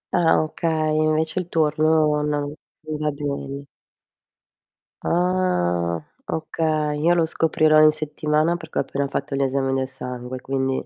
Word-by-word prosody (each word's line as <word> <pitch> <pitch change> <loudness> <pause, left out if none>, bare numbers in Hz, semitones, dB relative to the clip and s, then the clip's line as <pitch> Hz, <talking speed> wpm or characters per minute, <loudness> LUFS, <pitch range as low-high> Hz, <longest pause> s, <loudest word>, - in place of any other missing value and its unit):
Ah, 165 -2 +4
okay, 155 -1 -1
invece 155 +2 +1
il 175 -1 -5
turno 155 -1 +2
non 145 -1 -2 0.3
non 155 -1 -3
va 150 0 0
bene. 140 -1 -4 1.4
Ah, 90 - +1 0.3
okay. 155 -1 -1
Io 170 +3 +4
lo 170 -2 +3
scoprirò 155 -1 +3
in 155 0 +7
settimana 155 +2 0
perché 160 -2 -8
ho - - +4
appena 140 +1 -2
fatto 140 0 -3
gli 140 - 0
esami 135 0 0
del 135 0 0
sangue, 125 -1 -6
quindi 135 0 -1
150 Hz, 140 wpm, -23 LUFS, 140-160 Hz, 1.4 s, in